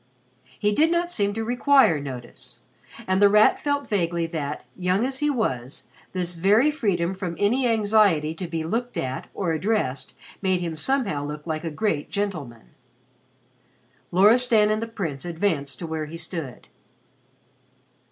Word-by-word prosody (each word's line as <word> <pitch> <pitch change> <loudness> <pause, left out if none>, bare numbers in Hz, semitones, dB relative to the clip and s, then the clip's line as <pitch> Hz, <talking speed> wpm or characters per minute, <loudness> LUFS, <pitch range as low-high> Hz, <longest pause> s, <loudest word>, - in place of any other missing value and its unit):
He 210 0 +1
did 310 +9 +3
not 345 +1 0
seem 205 -9 0
to 225 - -2
require 245 - +4
notice, 130 -4 -8 0.4
and 185 +1 +1
The 205 - +7
Rat 210 +1 +5
felt 285 -1 -1
vaguely 170 -4 0
that, 150 -3 -4
young 185 +5 +1
as 265 0 -3
he 295 - +1
was, 130 - -2 0.3
this 180 -1 -2
very 205 - +3
freedom 190 - 0
from 185 -3 -5
any 245 +7 +2
anxiety 205 -8 +3
to 175 +2 -6
be 165 -1 -3
looked 235 +9 -3
at 130 0 -4
or 175 -4 -1
addressed 155 - -1 0.3
made 185 -2 +1
him 170 -2 -3
somehow 200 - -1
look 150 +1 -6
like 155 -1 -3
a 165 - -2
great 155 -2 -1
gentleman. 155 - -4 1.4
Loristan 215 +3 +5
and 215 +1 0
the 230 - -3
Prince 165 - -5
advanced 165 -5 -1
to 175 - -6
where 160 -1 -4
he 165 +2 -8
stood. 165 -5 -6
185 Hz, 150 wpm, -24 LUFS, 160-220 Hz, 1.4 s, The